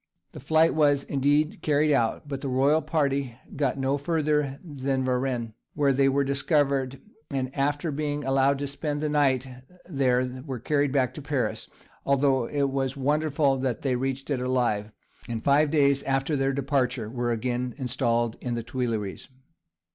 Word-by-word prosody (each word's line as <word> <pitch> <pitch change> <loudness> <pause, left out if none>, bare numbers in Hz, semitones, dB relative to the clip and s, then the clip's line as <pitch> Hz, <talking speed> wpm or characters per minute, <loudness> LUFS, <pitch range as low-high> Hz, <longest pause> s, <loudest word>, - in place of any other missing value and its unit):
The - - -9
flight 160 +4 +3
was, 145 -3 +3
indeed, 145 +3 +1
carried 150 0 +2
out, 120 +3 0
but 140 -2 -5
the 140 - -3
royal 140 +5 +3
party 140 -5 -1 0.2
got 140 -2 0
no 135 +1 0
further 150 -2 0
than 135 -4 -2
Varennes, 125 -2 -1 0.2
where 140 -2 +3
they 135 +1 +3
were 140 +1 +2
discovered, 140 -1 0 0.3
and 130 -2 -3
after 145 +3 0
being 145 0 -2
allowed 135 +1 +2
to 145 - -3
spend 145 +1 -3
the 155 - 0
night 135 -3 +2 0.4
there 130 -5 0
were 135 -3 -5
carried 145 +3 0
back 130 -3 +1
to 150 - -8
Paris 135 -6 -2 0.3
(although 135 -2 +2
it 140 -2 0
was 135 0 -2
wonderful 145 0 +1
that 130 -3 -2
they 130 -3 +1
reached 135 +3 -3
it 130 -3 0
alive), 120 -5 0 0.4
and 115 -1 -4
five 145 +2 +4
days 140 -2 +3
after 135 +3 0
their 135 -1 +1
departure 130 -4 -1
were 120 +1 -2
again 125 +2 -2
installed 120 -3 0
in 120 -2 -2
the 115 - -3
Tuileries. 115 -5 -3
135 Hz, 160 wpm, -26 LUFS, 130-145 Hz, 0.4 s, five